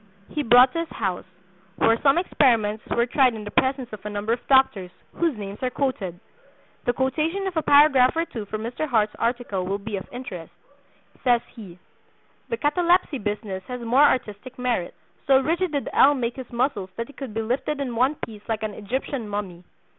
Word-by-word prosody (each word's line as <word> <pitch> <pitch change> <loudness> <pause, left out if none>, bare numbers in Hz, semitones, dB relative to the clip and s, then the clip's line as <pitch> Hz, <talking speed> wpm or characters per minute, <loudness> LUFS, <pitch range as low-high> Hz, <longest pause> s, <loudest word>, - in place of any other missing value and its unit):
he 300 - -2
brought 250 0 +6
to 335 - -1
his 335 - -2
house, 190 -5 -3 0.5
where 225 +3 +3
some 275 +1 +4
experiments 230 - +2
were 235 - +2
tried 250 -1 +3
in 215 - -7
the 205 - -7
presence 260 -1 +1
of 210 - -8
a 210 - -4
number 210 +2 -1
of 240 - -2
doctors, 265 -9 +4 0.2
whose 330 -8 0
names 200 0 -7
are 255 - 0
quoted. 225 -10 -3 0.7
The 245 - +3
quotation 310 +9 -1
of 380 -2 -3
a 320 - +2
paragraph 285 -4 +5
or 330 +1 +1
two 225 -9 -7
from 215 +1 -5
Mr. 245 +7 -3
Hart's 215 -4 +2
article 235 -6 -1
will 195 +2 -2
be 205 0 -5
of 190 - -8
interest. 190 -10 -8 0.7
Says 245 -2 +4
he: 195 -7 -11 0.7
"The 465 - -1
'catalepsy 340 - +2
business' 205 -2 -4
had 250 -1 -6
more 240 +4 +3
artistic 255 -2 +1
merit. 245 -8 -2 0.3
So 270 -1 +6
rigid 335 +5 0
did 285 -2 -2
L. 290 +2 +6
make 240 -2 -2
his 260 -2 -8
muscles 235 -6 -1
that 230 - -2
he 285 - -15
could 265 -5 -8
be 225 - -1
lifted 270 +6 -2
in 255 -4 -3
one 260 +6 +2
piece 215 -3 -12
like 220 -1 -2
an 215 -1 -3
Egyptian 235 +2 -4
mummy. 190 -4 -5
245 Hz, 195 wpm, -24 LUFS, 210-275 Hz, 0.7 s, brought